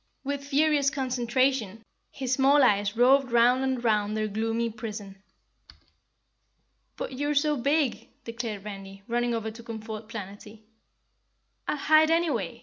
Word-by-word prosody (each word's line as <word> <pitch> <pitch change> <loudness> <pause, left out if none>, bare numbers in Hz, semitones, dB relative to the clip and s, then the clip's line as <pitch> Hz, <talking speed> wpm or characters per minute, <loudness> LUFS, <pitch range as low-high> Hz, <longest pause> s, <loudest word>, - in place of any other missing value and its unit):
With 280 0 -3
furious 285 0 +2
concentration 255 -4 -1 0.3
his 260 -2 -3
small 275 +2 +4
eyes 205 -2 +2
roved 260 +1 +4
round 245 +2 +4
and 260 -2 -1
round 215 -2 +1
their 215 0 0
gloomy 225 +2 -1
prison. 210 -3 -8 1.8
"But - - -5
you're 290 +3 -2
so 300 +1 +2
big," 285 +1 0 0.2
declared 230 -3 -5
Randy, 195 -1 -9
running 240 0 0
over 220 -1 -3
to 230 +2 -12
comfort 220 -1 -8
Planetty. 210 0 -9 1.0
"I'll - - -1
hide 310 +2 +4
anyway!" 305 - 0
235 Hz, 130 wpm, -27 LUFS, 215-275 Hz, 1.8 s, small